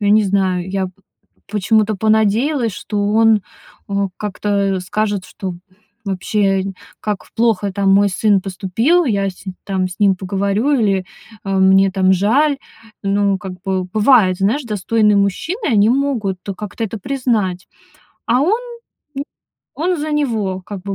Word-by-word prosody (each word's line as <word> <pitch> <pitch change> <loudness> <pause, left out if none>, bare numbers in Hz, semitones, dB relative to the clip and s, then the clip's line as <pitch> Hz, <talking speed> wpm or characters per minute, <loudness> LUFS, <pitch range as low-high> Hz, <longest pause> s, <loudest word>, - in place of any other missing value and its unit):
ну, 205 - -1
я 205 - +5
не 215 -1 +5
знаю, 190 -2 0
я 190 -1 -1
п 185 - -11 0.6
почему-то 215 +1 +2
понадеялась, 220 +4 +2
что 205 +2 -3
он, 220 -2 +4 0.5
а, 200 0 0
как-то, 210 0 -5 0.3
э, 185 - -3
скажет, 205 +1 -2
что 190 -2 -6 0.5
вообще 195 0 0
нь 195 - -4 0.3
"как 210 -2 -3
ф - - -23
плохо 220 -4 +1
там 195 0 +1
мой 200 +1 +5
сын 205 0 +2
поступил, 205 - +1
я, 200 -5 0
се 190 +1 -9
нь 185 - -12
там, 190 -2 -1
с 180 - -11
ним 195 -2 +3
поговорю" 200 +6 -1
или, 195 -3 +1 0.4
а, 195 -1 0
"мне 190 0 +5
там 190 -1 +2
жаль". 270 +10 +2 0.5
Ну, 200 0 +1
как 190 0 -7
бы 190 -2 -1
бывает, 205 -1 +3
знаешь, 225 +10 +1
достойный 210 0 +1
мужчина, 315 - -1
и - - +1
они 210 +2 +4
могут 245 -8 0 0.2
как-то 210 +2 -6
это 220 +1 -5
признать. 220 -7 -1 0.6
А 245 +3 +3
он, 410 +9 +2 0.6
м, 280 - -1 0.5
он 350 +4 0
за 305 +1 -3
него 220 -10 -1
как 200 -2 -7
бы 200 0 -4
205 Hz, 165 wpm, -18 LUFS, 190-225 Hz, 0.6 s, я